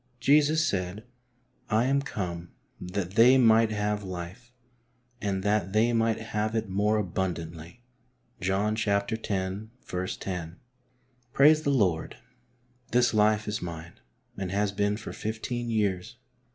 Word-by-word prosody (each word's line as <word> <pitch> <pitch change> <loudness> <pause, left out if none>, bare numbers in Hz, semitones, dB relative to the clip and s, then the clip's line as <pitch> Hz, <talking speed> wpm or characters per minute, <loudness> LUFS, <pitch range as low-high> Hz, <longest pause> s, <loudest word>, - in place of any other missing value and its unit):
Jesus 150 +3 +4
said: 95 -2 -2 0.3
" 125 - -41 0.2
I 110 +1 +3
am 140 +1 +2
come 90 -9 -5 0.3
that 90 0 -4
they 120 +6 +6
might 115 -2 +5
have 105 -1 -1
life, 95 +6 -7 0.7
and 95 -2 -1
that/ 105 -2 0
they 115 +3 +3
might 115 -1 +1
have 110 0 -2
it 110 -1 -1
more 105 +3 +1
abundantly" 85 +1 -4 0.6
{John 100 +3 0
x. 110 -1 -2
lo). 100 -1 -1 1.7
Praise 155 +3 +6
the 150 - -1
Lord, 95 - +1 0.7
this 120 -1 +3
life 110 0 +3
is 105 0 -2
mine, 85 -1 -8 0.4
and 95 -2 -3
has 100 +1 +1
been 105 +1 0
for 110 - -8
fifteen 120 +2 -4
years. 100 -5 -1
105 Hz, 125 wpm, -28 LUFS, 95-115 Hz, 1.7 s, they